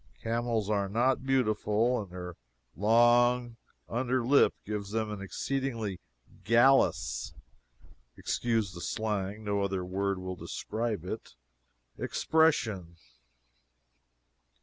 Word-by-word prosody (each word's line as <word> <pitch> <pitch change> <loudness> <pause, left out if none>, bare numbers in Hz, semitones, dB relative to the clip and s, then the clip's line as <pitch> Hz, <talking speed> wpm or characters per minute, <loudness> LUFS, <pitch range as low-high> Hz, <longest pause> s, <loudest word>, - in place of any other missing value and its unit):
Camels 115 -2 -1
are 100 -2 0
not 130 +5 +1
beautiful, 115 -2 +1
and 100 - -9
their 90 -1 -7 0.4
long 120 +3 +4 0.3
under 125 +1 -1
lip 140 +3 +5
gives 105 -1 -4
them 110 0 -2
an 105 -2 -6
exceedingly 115 -2 -3 0.4
"gallus" 120 +6 +3 0.8
[Excuse 115 -6 -1
the 85 - -8
slang, 105 0 -2
no 100 -1 0
other 95 -2 -1
word 100 +1 -1
will 95 0 -5
describe 110 0 -4
it] 110 - -6 0.6
expression. 110 - +1
110 Hz, 100 wpm, -30 LUFS, 100-120 Hz, 0.8 s, lip